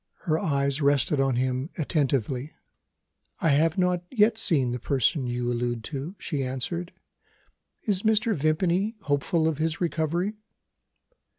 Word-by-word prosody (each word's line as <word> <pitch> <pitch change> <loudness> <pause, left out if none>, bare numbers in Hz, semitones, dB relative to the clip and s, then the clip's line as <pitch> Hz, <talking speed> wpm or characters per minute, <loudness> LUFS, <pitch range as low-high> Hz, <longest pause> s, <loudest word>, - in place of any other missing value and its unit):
Her 155 -1 0
eyes 140 -4 +1
rested 140 0 +2
on 135 -2 +2
him 130 +3 -1
attentively. 140 - -1 0.8
"I 165 - +2
have 155 +5 +3
not 180 -1 +1
yet 220 -2 +3
seen 140 - +2
the 125 - -3
person 130 +2 +1
you 120 0 -1
allude 120 -1 -2
to," 145 +8 -4
she 145 -5 -3
answered. 135 +8 -3 0.9
"Is 200 -4 0
Mr. 220 +1 +2
Vimpany 175 +8 +1
hopeful 155 +2 +1
of 160 -2 -1
his 160 0 0
recovery?" 170 +3 -1
155 Hz, 130 wpm, -26 LUFS, 135-175 Hz, 0.9 s, have